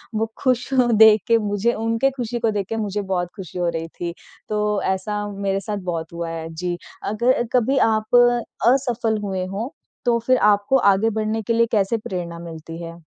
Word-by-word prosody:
वो 225 Hz, +1 st, -1 dB
खुश 255 Hz, 0 st, +1 dB
देख 220 Hz, -4 st, +6 dB
के 230 Hz, 0 st, +5 dB
मुझे 210 Hz, +2 st, 0 dB
उनके 230 Hz, +4 st, +1 dB
खुशी 245 Hz, -2 st, -4 dB
को 230 Hz, -1 st, +1 dB
देख 200 Hz, -2 st, -2 dB
के 225 Hz, -, -2 dB
मुझे 210 Hz, -1 st, -2 dB
बहुत 185 Hz, -3 st, -2 dB
खुशी 180 Hz, -2 st, -7 dB
हो 175 Hz, -1 st, +1 dB
रही 165 Hz, 0 st, -3 dB
थी। 170 Hz, +1 st, -6 dB, 0.4 s
तो 210 Hz, -, +1 dB, 0.2 s
ऐसा 205 Hz, +2 st, -1 dB
मेरे 195 Hz, -1 st, -1 dB
साथ 210 Hz, 0 st, -4 dB
बहुत 165 Hz, 0 st, -4 dB
हुआ 170 Hz, 0 st, -4 dB
है। 165 Hz, -1 st, -5 dB
जी। 175 Hz, +2 st, -3 dB, 0.3 s
अगर 240 Hz, +4 st, +1 dB
कभी 255 Hz, +2 st, +2 dB
आप 215 Hz, +2 st, 0 dB, 0.5 s
असफल 240 Hz, -4 st, +2 dB
हुए 190 Hz, -2 st, -2 dB
हों 205 Hz, +7 st, -4 dB, 0.4 s
तो 235 Hz, -1 st, +3 dB
फिर 255 Hz, +2 st, +2 dB
आपको 205 Hz, +4 st, +3 dB
आगे 210 Hz, +4 st, +2 dB
बढ़ने 220 Hz, +1 st, -1 dB
के 230 Hz, -, -1 dB
लिए 230 Hz, 0 st, +4 dB
कैसे 210 Hz, +1 st, +2 dB
प्रेरणा 175 Hz, -5 st, -5 dB
मिलती 165 Hz, 0 st, -8 dB
है? 165 Hz, 0 st, -8 dB
210 Hz, 190 wpm, -22 LUFS, 185-230 Hz, 0.5 s, देख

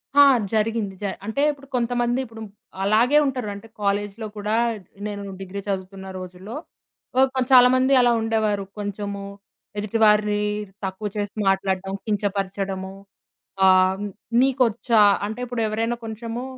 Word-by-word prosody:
ఆ! 285 Hz, -, +9 dB, 0.3 s
జరిగింది. 220 Hz, -2 st, 0 dB
జ -, -, -3 dB, 0.2 s
అంటే 220 Hz, +6 st, -1 dB
ఇప్పుడు 280 Hz, -1 st, -13 dB
కొంతమంది 240 Hz, 0 st, 0 dB
ఇప్పుడు 225 Hz, -2 st, -11 dB, 0.4 s
అలాగే 225 Hz, +8 st, +4 dB
ఉంటారు. 255 Hz, -5 st, -2 dB
అంటే 200 Hz, +3 st, -11 dB
కాలేజీ‌లో 205 Hz, +2 st, -1 dB
కూడా 210 Hz, +1 st, -1 dB, 0.5 s
నేను 205 Hz, -1 st, -5 dB, 0.2 s
డిగ్రీ 195 Hz, +1 st, -6 dB
చదువుతున్న 190 Hz, 0 st, -4 dB
రోజుల్లో 185 Hz, +5 st, -8 dB, 0.6 s
ఓ -, -, +5 dB, 0.2 s
కొ 260 Hz, -, +2 dB
చాలామంది 255 Hz, +1 st, +6 dB
అలా 245 Hz, -1 st, +4 dB
ఉండేవారు. 220 Hz, -2 st, 0 dB, 0.2 s
కొంచెము 200 Hz, 0 st, -4 dB, 0.5 s
ఎదుటివారిని 210 Hz, 0 st, +3 dB, 0.4 s
తక్కువ 190 Hz, +3 st, -4 dB
చేసి 205 Hz, -1 st, -3 dB
మాట్లాడడం, 190 Hz, 0 st, 0 dB
కించపరచడము. 195 Hz, -2 st, -2 dB, 0.7 s
ఆహ్, 185 Hz, +1 st, +4 dB, 0.4 s
నీకొచ్చా 245 Hz, -4 st, +3 dB, 0.2 s
అంటే 215 Hz, +3 st, -5 dB
ఇప్పుడు 245 Hz, -1 st, -3 dB
ఎవరైనా 225 Hz, +2 st, -1 dB
కొంచెము 230 Hz, +2 st, -5 dB
210 Hz, 120 wpm, -23 LUFS, 200-235 Hz, 0.7 s, ఆ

